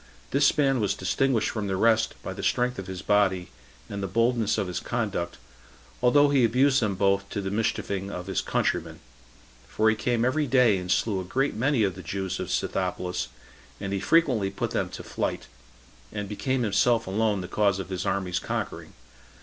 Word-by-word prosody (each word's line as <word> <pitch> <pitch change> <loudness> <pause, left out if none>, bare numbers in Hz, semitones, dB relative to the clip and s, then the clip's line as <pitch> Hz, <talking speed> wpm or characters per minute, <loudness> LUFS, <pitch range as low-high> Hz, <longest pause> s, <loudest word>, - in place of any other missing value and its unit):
This 145 +2 +3
man 135 -3 +3
was 105 -3 0
distinguished 115 +4 +1
from 105 -3 -3
the 95 - -1
rest 110 +1 +3
by 95 - -4
the 100 - -7
strength 125 +2 0
of 95 - -6
his 95 -1 -6
body, 95 -5 +2 0.4
and 100 0 -5
the 95 - -2
boldness 115 +2 +1
of 100 - 0
his 90 -1 -3
conduct, 100 -7 -3 0.6
although 145 +4 +5
he 135 -3 +4
abused 130 +4 +3
them 105 -3 0
both 100 +1 +1
to - - -3
the 95 -1 -3
mischieving 100 -2 -1
of 90 -2 -6
his 95 -1 -1
countrymen; - - -1 0.7
for 110 0 +2
he - - 0
came 120 +2 0
every 145 +3 +1
day 120 -6 +4
and 90 0 -4
slew 105 -4 +1
a - - -3
great 135 +10 0
many 130 0 +1
of 95 -2 +1
the 95 - -9
Jews 95 +2 -3
of - - -4
Scythopolis, 90 -1 -2 0.5
and 100 -1 -4
he 100 - 0
frequently 125 - +3
put 95 - -3
them - - -1
to - - -8
flight, - - -3 0.7
and 105 -1 -4
became 130 +5 -1
himself 115 +2 +2
alone 105 +1 0
the 90 - -6
cause 100 -1 +1
of 95 -2 -6
his 95 -1 -3
army's 95 -2 -1
conquering. - - -4
105 Hz, 190 wpm, -26 LUFS, 95-125 Hz, 0.7 s, although